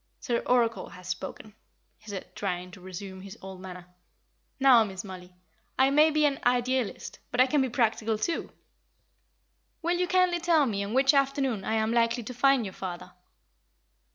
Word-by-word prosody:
"Sir 235 Hz, -2 st, -1 dB
Oracle 235 Hz, -2 st, +1 dB
has 180 Hz, -2 st, -12 dB
spoken," 190 Hz, +3 st, -6 dB, 0.5 s
he 215 Hz, +1 st, -14 dB
said, 195 Hz, -2 st, -7 dB
trying 180 Hz, 0 st, -3 dB
to 185 Hz, -, -13 dB
resume 190 Hz, +1 st, -8 dB
his 195 Hz, 0 st, -10 dB
old 190 Hz, -1 st, -10 dB
manner. 180 Hz, -1 st, -9 dB, 0.7 s
"Now, 260 Hz, -4 st, +7 dB
Miss 190 Hz, -3 st, -6 dB
Mollie, 180 Hz, -2 st, -10 dB, 0.4 s
I 265 Hz, +1 st, +4 dB
may 300 Hz, +3 st, +6 dB
be 305 Hz, -1 st, +2 dB
an 280 Hz, -2 st, +1 dB
Idealist, 250 Hz, -1 st, 0 dB
but 245 Hz, -, -3 dB
I 255 Hz, -, +8 dB
can 275 Hz, +2 st, +2 dB
be 260 Hz, -, 0 dB
practical, 225 Hz, -2 st, 0 dB
too. 330 Hz, +10 st, -2 dB, 1.3 s
Will 350 Hz, +1 st, +1 dB
you 360 Hz, -, +1 dB
kindly 360 Hz, -1 st, +2 dB
tell 330 Hz, -3 st, +3 dB
me 200 Hz, -5 st, -1 dB
on 205 Hz, +4 st, -4 dB
which 270 Hz, +2 st, +5 dB
afternoon 270 Hz, -6 st, +1 dB
I 220 Hz, -, -1 dB
am 220 Hz, +1 st, +1 dB
likely 235 Hz, 0 st, +2 dB
to 250 Hz, -, -7 dB
find 265 Hz, -1 st, +3 dB
your 190 Hz, -, -6 dB
father." 180 Hz, -1 st, -7 dB
230 Hz, 175 wpm, -28 LUFS, 190-270 Hz, 1.3 s, I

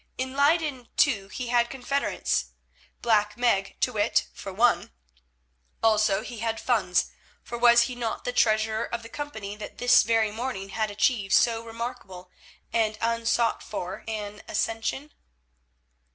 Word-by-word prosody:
In 260 Hz, 0 st, -3 dB
Leyden, 285 Hz, -3 st, +1 dB
too, 210 Hz, -9 st, +3 dB
he 245 Hz, +4 st, -6 dB
had 240 Hz, 0 st, +3 dB
confederates—Black 240 Hz, -5 st, -2 dB
Meg 195 Hz, -6 st, +1 dB
to 250 Hz, -, +1 dB
wit, 210 Hz, +1 st, +1 dB
for 195 Hz, -, -8 dB
one; 230 Hz, +5 st, +2 dB, 0.9 s
also 215 Hz, -2 st, +3 dB
he 240 Hz, -2 st, -8 dB
had 225 Hz, 0 st, -2 dB
funds, 195 Hz, -8 st, +1 dB, 0.3 s
for 240 Hz, -, -7 dB
was 235 Hz, 0 st, +6 dB
he 250 Hz, -, -3 dB
not 235 Hz, -2 st, -4 dB
the 245 Hz, -, -3 dB
treasurer 220 Hz, -1 st, +2 dB
of 235 Hz, 0 st, -5 dB
the 230 Hz, -, -10 dB
company 220 Hz, -8 st, -6 dB
that 210 Hz, -, -9 dB
this 245 Hz, 0 st, +6 dB
very 220 Hz, -1 st, +2 dB
morning 220 Hz, -4 st, -4 dB
had 215 Hz, +2 st, -1 dB
achieved 205 Hz, -1 st, +1 dB
so 230 Hz, -1 st, +3 dB
remarkable 225 Hz, -6 st, -7 dB, 0.4 s
and 220 Hz, -2 st, +1 dB
unsought 230 Hz, 0 st, +1 dB
for 185 Hz, -2 st, -6 dB
an 210 Hz, -2 st, -5 dB
ascension? 225 Hz, +7 st, -2 dB
225 Hz, 140 wpm, -26 LUFS, 210-245 Hz, 0.9 s, was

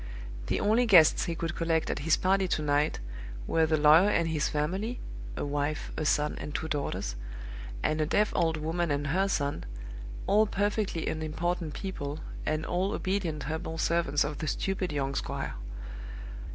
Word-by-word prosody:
The -, -, +1 dB
only 225 Hz, +4 st, +3 dB
guests 170 Hz, -7 st, +7 dB
he 170 Hz, -, -2 dB
could 165 Hz, 0 st, -2 dB
collect 165 Hz, -1 st, +1 dB
at -, -, -2 dB
his 155 Hz, +3 st, +3 dB
party 190 Hz, 0 st, +2 dB
to 155 Hz, -, 0 dB
night 145 Hz, +1 st, +2 dB, 0.5 s
were 160 Hz, -1 st, +3 dB
the 155 Hz, 0 st, +3 dB
lawyer 155 Hz, +6 st, +7 dB
and 170 Hz, -5 st, +2 dB
his 155 Hz, -2 st, +1 dB
family 190 Hz, +11 st, -1 dB, 0.4 s
(a -, -, -1 dB
wife, 145 Hz, +1 st, -2 dB
a 155 Hz, -, -2 dB
son, 150 Hz, +1 st, +2 dB
and 150 Hz, -, -6 dB
two 160 Hz, -, -1 dB
daughters), 140 Hz, -, -2 dB, 0.7 s
and 155 Hz, 0 st, +1 dB
a 155 Hz, -, +1 dB
deaf 210 Hz, +5 st, +3 dB
old 165 Hz, -2 st, +2 dB
woman 165 Hz, +2 st, -1 dB
and 145 Hz, 0 st, 0 dB
her 185 Hz, +8 st, +2 dB
son 145 Hz, -6 st, -1 dB, 0.6 s
all 215 Hz, +2 st, +4 dB
perfectly 205 Hz, -4 st, 0 dB
unimportant 160 Hz, 0 st, -2 dB
people, 150 Hz, -6 st, -4 dB, 0.3 s
and 155 Hz, +1 st, 0 dB
all 185 Hz, +3 st, 0 dB
obedient 180 Hz, -6 st, -1 dB
humble 160 Hz, +2 st, -3 dB
servants 165 Hz, -3 st, +2 dB
of 150 Hz, 0 st, -4 dB
the 155 Hz, -, -3 dB
stupid 190 Hz, +2 st, -1 dB
young 140 Hz, -2 st, -1 dB
squire. -, -, -3 dB
160 Hz, 165 wpm, -29 LUFS, 150-185 Hz, 0.7 s, guests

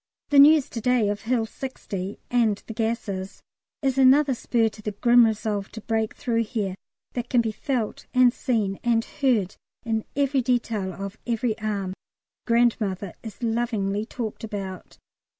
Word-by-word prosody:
The 290 Hz, -1 st, +6 dB
news 295 Hz, 0 st, +7 dB
to 230 Hz, -, -4 dB
day 245 Hz, -3 st, +2 dB
of 205 Hz, 0 st, -2 dB
Hill 230 Hz, -1 st, 0 dB
60 205 Hz, -6 st, -6 dB
and 225 Hz, -4 st, +2 dB
the 225 Hz, -, -7 dB
gases 220 Hz, -4 st, -3 dB, 0.4 s
is 270 Hz, -1 st, +1 dB
another 270 Hz, +2 st, +6 dB
spur 235 Hz, -1 st, +1 dB
to 215 Hz, 0 st, -8 dB
the 210 Hz, 0 st, -4 dB
grim 240 Hz, +2 st, +5 dB
resolve 210 Hz, -2 st, -2 dB
to 220 Hz, -, -7 dB
break 220 Hz, 0 st, -1 dB
through 230 Hz, -3 st, 0 dB
here, 210 Hz, -5 st, -2 dB, 0.4 s
that 245 Hz, -1 st, -4 dB
can 245 Hz, -, +3 dB
be 225 Hz, -1 st, +1 dB
felt 240 Hz, -1 st, -3 dB
and 255 Hz, -2 st, +5 dB
seen 215 Hz, -9 st, -1 dB
and 230 Hz, -1 st, +2 dB
heard 235 Hz, -9 st, 0 dB, 0.3 s
in 220 Hz, -1 st, 0 dB
every 275 Hz, -1 st, +2 dB
detail 230 Hz, -6 st, 0 dB
of 195 Hz, +2 st, -7 dB
every 230 Hz, -1 st, 0 dB
arm. 200 Hz, -3 st, -2 dB, 0.5 s
"Grandmother" 220 Hz, -6 st, +1 dB
is 225 Hz, +2 st, -9 dB
lovingly 225 Hz, -3 st, 0 dB
talked 225 Hz, -1 st, -6 dB
about. 195 Hz, -4 st, -6 dB
225 Hz, 155 wpm, -25 LUFS, 205-245 Hz, 0.5 s, news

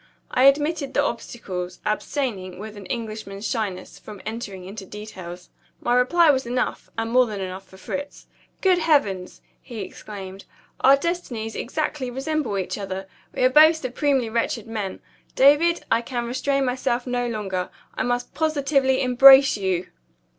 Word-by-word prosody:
I 255 Hz, -, +3 dB
admitted 290 Hz, 0 st, +2 dB
the 285 Hz, -, +3 dB
obstacles; 190 Hz, -8 st, -5 dB
abstaining, 210 Hz, -5 st, -2 dB
with 215 Hz, +2 st, -8 dB
an 200 Hz, -2 st, -10 dB
Englishman's 215 Hz, -4 st, -5 dB
shyness, 200 Hz, -6 st, -4 dB
from 210 Hz, -2 st, -11 dB
entering 215 Hz, -4 st, -6 dB
into 200 Hz, +2 st, -8 dB
details. 185 Hz, -3 st, -9 dB, 0.3 s
My 240 Hz, -, 0 dB
reply 300 Hz, +6 st, +5 dB
was 265 Hz, -3 st, -1 dB
enough, 250 Hz, +1 st, -2 dB
and 225 Hz, 0 st, -2 dB
more 250 Hz, 0 st, +5 dB
than 210 Hz, -2 st, -5 dB
enough, 190 Hz, 0 st, -6 dB
for 190 Hz, -, -16 dB
Fritz. 285 Hz, +9 st, -6 dB, 0.4 s
"Good 370 Hz, -2 st, +4 dB
Heavens!" 215 Hz, -, +1 dB, 0.2 s
he 235 Hz, -4 st, -7 dB
exclaimed; 195 Hz, -2 st, -9 dB, 0.3 s
"our 270 Hz, +1 st, +7 dB
destinies 275 Hz, -9 st, -3 dB
exactly 295 Hz, 0 st, -3 dB
resemble 270 Hz, -3 st, -2 dB
each 190 Hz, +2 st, -3 dB
other! 190 Hz, -1 st, -5 dB, 0.2 s
We -, -, -2 dB
are 255 Hz, -, +6 dB
both 310 Hz, +4 st, +7 dB
supremely 270 Hz, -2 st, 0 dB
wretched 230 Hz, 0 st, -1 dB
men. 215 Hz, -4 st, -5 dB, 0.3 s
David, 295 Hz, +6 st, +4 dB
I 230 Hz, -, +4 dB
can 240 Hz, 0 st, -4 dB
restrain 270 Hz, +3 st, 0 dB
myself 250 Hz, -1 st, -1 dB
no 245 Hz, -1 st, -1 dB
longer; 195 Hz, -5 st, -3 dB, 0.2 s
I -, -, -3 dB
must 245 Hz, 0 st, -1 dB
positively 280 Hz, -4 st, +1 dB
embrace 270 Hz, +2 st, +8 dB
you!" 190 Hz, -3 st, -1 dB
240 Hz, 150 wpm, -23 LUFS, 200-275 Hz, 0.4 s, embrace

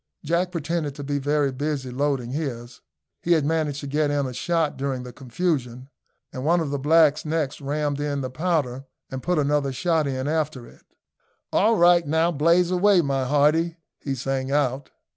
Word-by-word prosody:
Jack 170 Hz, +3 st, 0 dB
pretended 160 Hz, -3 st, -3 dB
to 145 Hz, -, -7 dB
be 145 Hz, 0 st, -2 dB
very 145 Hz, 0 st, +1 dB
busy 135 Hz, -1 st, -3 dB
loading 135 Hz, -2 st, -1 dB
his. 125 Hz, -4 st, -5 dB, 0.4 s
He 175 Hz, -, +2 dB
had 155 Hz, -4 st, +2 dB
managed 150 Hz, -2 st, -1 dB
to -, -, -7 dB
get 145 Hz, +1 st, 0 dB
in 145 Hz, -1 st, 0 dB
a 130 Hz, -, -5 dB
shot 165 Hz, +4 st, 0 dB
during 135 Hz, -2 st, -3 dB
the 125 Hz, -1 st, -9 dB
confusion, 130 Hz, -2 st, -3 dB, 0.4 s
and 130 Hz, -, -5 dB
one 170 Hz, +4 st, +3 dB
of 155 Hz, -4 st, -2 dB
the 140 Hz, -, -2 dB
blacks 155 Hz, +1 st, +4 dB
next 155 Hz, -2 st, -2 dB
rammed 145 Hz, 0 st, -2 dB
in 145 Hz, -1 st, -2 dB
the 130 Hz, -1 st, -4 dB
powder 140 Hz, -4 st, -1 dB, 0.3 s
and 130 Hz, -1 st, -5 dB
put 180 Hz, +3 st, 0 dB
another 145 Hz, -1 st, +1 dB
shot 160 Hz, +1 st, 0 dB
in 130 Hz, 0 st, -2 dB
after 150 Hz, -5 st, -2 dB
it. -, -, -17 dB, 0.7 s
"All 225 Hz, +3 st, +4 dB
right! 175 Hz, -2 st, +5 dB
now 160 Hz, +3 st, +2 dB
blaze 170 Hz, +3 st, +3 dB
away, 185 Hz, 0 st, +4 dB
my 135 Hz, -2 st, -1 dB
hearty!" 155 Hz, +5 st, +2 dB, 0.2 s
he 135 Hz, -2 st, -3 dB
sang 135 Hz, +1 st, -2 dB
out. 140 Hz, -1 st, 0 dB
145 Hz, 180 wpm, -24 LUFS, 135-160 Hz, 0.7 s, right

